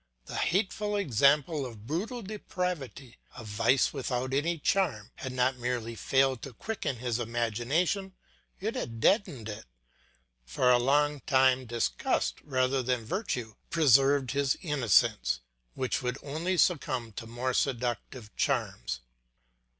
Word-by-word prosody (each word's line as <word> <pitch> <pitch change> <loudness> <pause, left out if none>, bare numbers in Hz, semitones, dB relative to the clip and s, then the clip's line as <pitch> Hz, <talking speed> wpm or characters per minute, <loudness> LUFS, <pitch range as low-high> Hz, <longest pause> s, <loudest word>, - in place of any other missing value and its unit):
The - - -6
hateful 205 +3 0
example 145 - +3
of 115 -5 -8
brutal 210 - -3
depravity, 180 - -5 0.2
of 115 - -9
vice 110 +5 +2
without 130 -2 -2
any 165 +5 +1
charm, 150 - 0
had 130 - -5
not 130 0 +1
merely 120 -2 -2
failed 135 +1 +1
to 135 - -8
quicken 215 - -3
his 120 0 -2
imagination, 120 - 0 0.5
it - - -2
had 115 -1 -4
deadened 135 - +2
it. 105 0 -7 0.8
For 95 - +2
a 125 - +5
long 145 +3 +2
time 130 -1 +4
disgust 115 - -1
rather 130 -1 +1
than 125 -2 -1
virtue 125 - -3 0.2
preserved 140 -3 +4
his 140 -1 +1
innocence, 105 - +2 0.3
which 130 - -1
would 125 +1 -2
only 165 +6 -2
succumb 130 -10 +1
to 115 +2 -7
more 120 +3 -2
seductive 120 -3 -2
charms. - - -1
130 Hz, 125 wpm, -29 LUFS, 120-150 Hz, 0.8 s, a